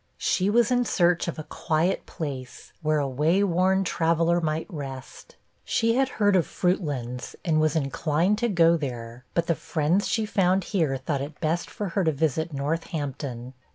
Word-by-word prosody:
'She 190 +1 +1
was 235 +2 +3
in 245 0 +3
search 175 -6 +2
of 170 - -3
a 155 - -5
quiet 165 +4 -1
place, 135 -5 -7
where 155 -1 +1
a 145 -2 0
way 155 +9 +2
worn 190 +1 +2
traveller 170 0 +1
might 155 0 -1
rest. 135 -7 -8 0.3
She 230 0 +1
had 265 +2 +2
heard 205 -2 +4
of 180 - +3
Fruitlands, 145 -9 -2
and 155 -2 +2
was 155 0 +2
inclined 160 +6 +1
to 240 0 +1
go 170 -3 +4
there; 120 -4 -6
but 170 - +2
the 170 - +2
friends 160 +5 0
she 220 -1 0
found 190 -2 +2
here 160 -9 0
thought 135 +1 -2
it 145 +3 -7
best 165 +2 -1
for 205 -2 -4
her 190 +3 0
to 160 - +3
visit 160 +2 -1
Northampton. 140 -4 -4
165 Hz, 175 wpm, -26 LUFS, 145-185 Hz, 0.3 s, heard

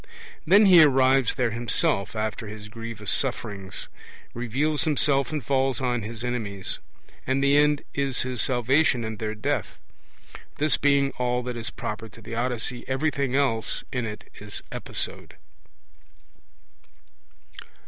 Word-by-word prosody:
Then 200 +5 +7
he 180 -4 +8
arrives 135 -3 +4
there 125 -3 0
himself 115 -4 +1
after 110 0 -3
his 105 0 -9
grievous 115 -2 -5
sufferings; 100 -7 -1 0.5
reveals 135 +6 0
himself, 140 -3 +2
and 150 -6 -4
falls 135 -1 +1
on 125 -3 -1
his 110 +2 -7
enemies; 110 -6 -3 0.5
and 135 +1 +1
the 140 0 +4
end 150 0 +3
is 135 -2 +1
his 125 -1 -1
salvation 125 +1 +2
and 110 -2 -6
their 110 -1 -3
death. 105 - -2 0.8
This 155 +1 +4
being 140 -1 +2
all 125 0 0
that 125 0 -5
is 120 +1 -4
proper 110 +1 -6
to 115 - -16
the 115 - -8
Odyssey, 120 0 -2
everything 135 -1 -1
else 130 -6 0
in 125 -4 -2
it 105 -1 -8
is 105 0 -5
episode. - - -3
125 Hz, 135 wpm, -25 LUFS, 110-140 Hz, 0.8 s, he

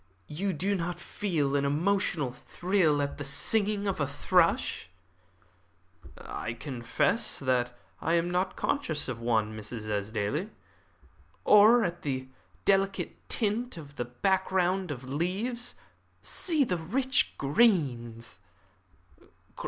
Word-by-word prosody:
You 190 +7 -1
do 190 +5 -1
not 175 -2 -2
feel 160 -8 -1
an 140 - +2
emotional 155 -1 +1
thrill 160 +3 +1
at 140 0 -4
the - - -3
singing 205 +8 +1
of 195 - 0
that 145 - 0
thrush?" 165 - +1 1.3
"I 115 - -5
confess 125 - 0
that 125 -2 0 0.2
I 165 - 0
am 170 +1 +1
not 185 +1 0
conscious 160 - -1
of 125 -3 -4
one, 110 -2 0
Mrs. 110 +1 -6
Esdaile." 105 - -2 1.0
"Or 220 +3 +7
at 175 -2 -3
the 130 -2 -3 0.4
delicate 195 0 0
tint 230 0 -1
of 145 -3 -11
that 120 0 -7
background 190 -1 +2
of 135 -3 -5
leaves? 190 - -2 0.5
See 320 -5 0
the 185 -8 -1
rich 255 +11 +1
greens!" 135 - +1
165 Hz, 115 wpm, -29 LUFS, 130-195 Hz, 1.3 s, Or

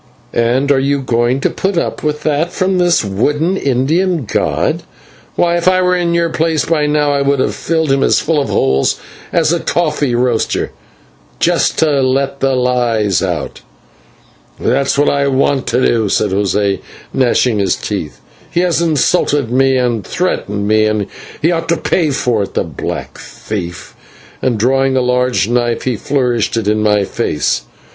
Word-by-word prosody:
"And 125 +4 +1
are 135 - +3
you 140 +1 +1
going 125 0 0
to - - +1
put 190 -1 -2
up - - -2
with 150 0 -2
that 155 +3 0
from 185 0 0
this 175 -9 +2
wooden 145 - 0
Indian 155 +3 0
god? - - 0 0.5
Why, 170 0 +2
if 170 - -1
I 185 0 +4
were 180 0 +2
in 170 -1 0
your 170 0 +1
place, 160 -1 0
by 155 -3 +1
now 150 -1 +1
I 140 - +1
would 140 0 +1
have - - 0
filled 160 -3 -1
him 135 0 +2
as - - +3
full 155 -2 0
of 140 - -3
holes 65 0 +1 0.3
as 165 -1 +2
a 170 - 0
coffee 150 -7 0
roaster, 120 -2 0 0.7
just - - +1
to 150 -4 +2
let 135 +1 0
the 135 -1 +1
lies 120 -6 +1
out." - - -3 1.0
"That's 140 0 +1
what 145 - +3
I 140 0 +2
want 135 0 +1
to 125 +2 +1
do," 110 -3 +1
said - - +1
José, 100 0 0 0.3
gnashing 125 -3 +2
his 95 -2 +1
teeth, - - -5 0.3
"he 175 - 0
has 175 -2 +1
insulted 150 -5 +1
me 135 +1 +3
and 120 -4 0
threatened 105 - -2
me, 110 0 +3
and 105 -1 0 0.5
ought 165 0 -3
to 170 - +2
pay 160 0 0
for 125 -5 0
it, 100 - -5
the - - +1
black 80 -6 -6
thief," 90 -5 -7 0.5
and, 125 -3 0
drawing 135 +4 +2
a - - +3
large 125 -3 +1
knife, 120 0 0
he 125 -2 -1
flourished 120 -2 0
it 110 -3 -2
in 105 0 +1
my 105 -1 +2
face. 85 -11 -1
135 Hz, 170 wpm, -15 LUFS, 115-155 Hz, 1.0 s, I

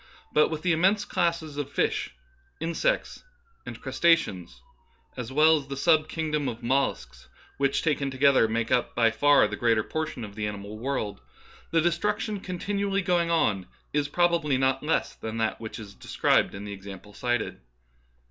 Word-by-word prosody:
But 150 - +4
with 155 -1 -5
the 180 - +2
immense 190 +6 +3
classes 170 -5 -1
of 145 -2 -3
fishes, - - 0 0.5
insects, 170 - -1 0.4
and - - -7
crustaceans, 95 - +1 0.6
as 125 0 -6
well 155 +3 +5
as 140 -2 -7
the 140 0 -5
sub 155 +1 +3
king 160 -1 -3
dom 150 -2 0
of 120 0 -8
mollusks, 65 - -1
— - - -28
which 140 -1 +1
taken 145 -3 0
together 130 -3 +4
make 115 +1 -2
up 125 - +1
by 115 -2 +4
far 145 +5 +4
the - - -5
greater 115 -3 +2
portion 155 -4 -4
of 100 - -11
the 105 0 -3
animal 105 +1 -7
world, 120 -5 -3 0.2
— - - -24
the 165 - +3
destruction 205 +5 0
continually 200 +2 -2
going 175 -1 +1
on 105 - +1 0.3
is 145 -1 +1
prob 175 +3 +2
ably 150 -5 +1
not 130 0 +1
less 155 +2 0
than 110 0 -6
that 110 -1 -1
which 110 - -6
is 105 -3 -9
described - - +1
in 100 +1 -7
tlie 100 - -6
example 100 +1 -10
cited. 120 - -2
140 Hz, 175 wpm, -27 LUFS, 110-165 Hz, 0.6 s, well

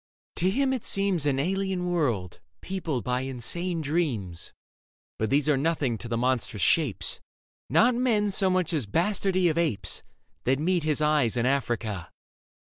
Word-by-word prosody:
To 180 - +2
him 265 +6 +1
it 255 - -3
seems 195 -6 +1
An 135 -2 +2
alien 190 +4 -1
world, 125 - -1 0.2
peopled 165 -10 -3
by 125 0 0
insane 160 +7 -3
dreams. 135 - -2 0.7
But 110 - 0
these 145 +2 +2
are 150 -3 +3
nothing 140 -6 0
to 105 - -7
the 115 0 -1
monstrous 120 -4 0
shapes 145 - +1 0.3
— - - -88
Not 225 - +5
men 225 -4 +1
so 190 0 +1
much 185 -2 0
as 140 -9 -1
bastardy 185 - +1
of 165 0 +1
apes 110 - -1 0.2
— - - -45
That 130 +2 +3
meet 170 +3 +1
his 155 -1 +1
eyes 150 -6 +2
in 120 - +1
Africa. 120 -8 -1
155 Hz, 165 wpm, -27 LUFS, 125-185 Hz, 0.7 s, Not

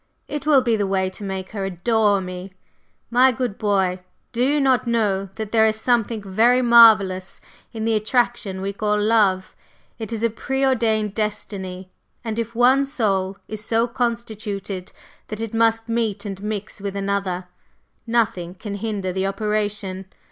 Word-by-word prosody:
It 295 0 -5
will 280 -4 +5
be 235 -2 +2
the 205 -2 0
way 190 -1 0
to 195 - -10
make 190 -1 -5
her 200 -2 -4
adore 200 +2 +1
me! 185 +1 -7 0.6
My 255 +2 +5
good 245 -4 -3
boy, 190 -3 +1 0.3
do 245 0 0
you 290 +3 +2
not 260 -3 +2
know 205 -4 0
that 220 -1 -5
there 220 -1 +5
is 220 0 0
something 230 -2 0
very 230 +6 +3
marvellous 215 -6 +5 0.3
in 220 -1 -4
the 225 - +2
attraction 215 -3 0
we 200 +1 -3
call 210 +1 0
love? 205 -3 +2 0.4
It 220 -1 -5
is 225 -1 -3
a 230 - +2
pre 265 +4 -1
ordained 220 -5 +1
destiny, 190 -3 -4 0.3
and 225 -1 -3
if 230 0 -4
one 255 +3 +5
soul 195 -8 -1
is 215 -1 -5
so 230 +2 +1
constituted 220 -6 -4 0.4
that 215 - -6
it 225 -1 -4
must 225 0 +2
meet 230 -2 -1
and 195 -1 -6
mix 210 -1 -5
with 200 -1 -4
another, 195 -2 -2 0.6
nothing 195 -7 0
can 200 +2 -7
hinder 200 -3 -3
the 190 +1 -1
operation. 205 -2 -2
215 Hz, 160 wpm, -22 LUFS, 195-230 Hz, 0.6 s, will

